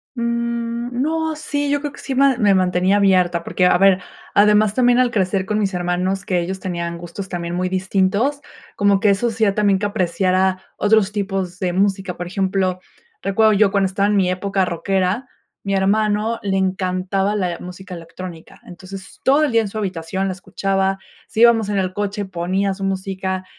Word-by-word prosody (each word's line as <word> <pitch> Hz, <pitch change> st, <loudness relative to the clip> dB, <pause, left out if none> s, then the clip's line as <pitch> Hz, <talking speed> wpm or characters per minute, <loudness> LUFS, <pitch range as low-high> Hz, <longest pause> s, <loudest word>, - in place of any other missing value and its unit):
Mm, 235 Hz, 0 st, -2 dB
no, 320 Hz, +2 st, -1 dB
sí, 290 Hz, -2 st, -2 dB
yo 285 Hz, 0 st, +1 dB
creo 290 Hz, -1 st, -4 dB
que -, -, -13 dB
sí 270 Hz, -, -4 dB
me 270 Hz, -1 st, +3 dB
me 205 Hz, -4 st, +4 dB
mantenía 185 Hz, +1 st, +2 dB
abierta 180 Hz, -4 st, +2 dB
porque, 180 Hz, -, +1 dB
a 180 Hz, -, +4 dB
ver, 195 Hz, -1 st, +5 dB, 0.3 s
además 210 Hz, 0 st, +4 dB
también 245 Hz, -1 st, +3 dB
al 250 Hz, -1 st, +3 dB
crecer 190 Hz, -2 st, 0 dB
con 210 Hz, +1 st, -1 dB
mis 195 Hz, -3 st, -1 dB
hermanos, 180 Hz, +2 st, -1 dB
que 180 Hz, -2 st, 0 dB
ellos 190 Hz, +2 st, -4 dB
tenían 170 Hz, -2 st, -4 dB
gustos 175 Hz, +3 st, -7 dB
también 175 Hz, -1 st, -4 dB
muy 185 Hz, +1 st, -1 dB
distintos, 195 Hz, +8 st, 0 dB, 0.4 s
como 200 Hz, -1 st, +3 dB
que 205 Hz, -, +4 dB
eso 200 Hz, +5 st, +1 dB
hacía 220 Hz, -3 st, +1 dB
también, 205 Hz, -2 st, +2 dB
que 205 Hz, -, -1 dB
apreciara 185 Hz, 0 st, 0 dB
otros 210 Hz, -1 st, +2 dB
tipos 195 Hz, -3 st, -3 dB
de 180 Hz, -3 st, -1 dB
música. 195 Hz, -1 st, 0 dB
Por 175 Hz, -, -5 dB
ejemplo, 185 Hz, 0 st, -1 dB, 0.4 s
recuerdo 215 Hz, +2 st, +3 dB
yo 205 Hz, -1 st, +4 dB
cuando 200 Hz, -1 st, +2 dB
estaba 200 Hz, +2 st, 0 dB
en 210 Hz, -, +2 dB
mi 185 Hz, -2 st, +2 dB
época 195 Hz, +1 st, 0 dB
rockera, 190 Hz, +6 st, -1 dB, 0.3 s
mi 195 Hz, 0 st, -2 dB
hermano 210 Hz, +3 st, +1 dB
le 195 Hz, -1 st, -1 dB
encantaba 190 Hz, +1 st, 0 dB
la 180 Hz, -4 st, -2 dB
música 180 Hz, +1 st, -9 dB
electrónica. 165 Hz, 0 st, -10 dB
Entonces, 190 Hz, +2 st, -11 dB
todo 285 Hz, +3 st, +4 dB
el 285 Hz, -, -1 dB
día 230 Hz, -, +4 dB
en 215 Hz, -, -2 dB
su 210 Hz, -, -10 dB
habitación 190 Hz, -1 st, -3 dB
la 190 Hz, -, -2 dB
escuchaba, 195 Hz, +1 st, -1 dB, 0.3 s
si 220 Hz, -, -4 dB
íbamos 225 Hz, -3 st, +5 dB
en 205 Hz, -, 0 dB
el 185 Hz, -1 st, -1 dB
coche 205 Hz, +1 st, -3 dB
ponía 190 Hz, +2 st, -1 dB
su 195 Hz, -, -10 dB
música 190 Hz, -1 st, -3 dB
195 Hz, 185 wpm, -20 LUFS, 185-210 Hz, 0.4 s, ver